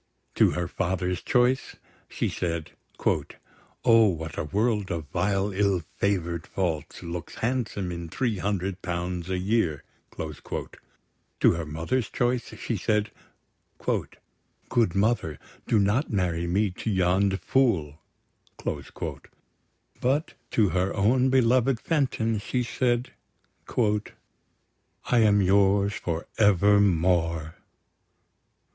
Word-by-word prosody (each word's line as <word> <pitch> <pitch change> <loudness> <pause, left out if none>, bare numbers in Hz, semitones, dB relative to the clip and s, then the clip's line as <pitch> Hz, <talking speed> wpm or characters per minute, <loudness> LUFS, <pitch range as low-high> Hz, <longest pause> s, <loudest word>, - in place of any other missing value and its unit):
To - - +5
her 85 -1 -1
father's 90 0 -1
choice, 125 +1 +1 0.3
she - - -1
said: 85 -2 -3 1.1
"O, 115 -1 +7
what 80 -4 -3
a - - -2
world 105 +3 0
of 85 -3 -3
vile 95 +4 0
ill 100 -2 +1 0.2
favour'd 85 -5 -1
faults 85 -6 -3
Looks 85 -1 -6
handsome 110 -6 -2
in 85 -1 -6
three 115 0 -1
hundred 95 -1 -2
pounds 90 0 -3
a 95 - 0
year!" 90 -6 0 0.3
To 75 -2 -3
her 85 -1 -2
mother's 85 +11 -1
choice, 120 0 0
she - - -2
said: 105 -1 0 0.7
"Good 115 -6 -3
mother, 100 - +1 0.3
do 115 - +3
not 105 +8 +2
marry 85 -4 0
me 100 +3 +1
to 95 - -5
yond' 95 0 +2
fool!" 85 - +1 0.6
But 140 +5 -5 0.2
to 105 -4 +3
her 95 +1 0
own 125 +6 +3
beloved 130 -1 +3
Fenton, 125 -7 0
she 125 +4 -1
said: 120 0 0 0.7
"I 105 +2 -3
am 105 -2 +5
yours 100 +1 +3
for 85 -4 -3
evermore!" 90 -5 +3
100 Hz, 105 wpm, -26 LUFS, 85-115 Hz, 1.1 s, O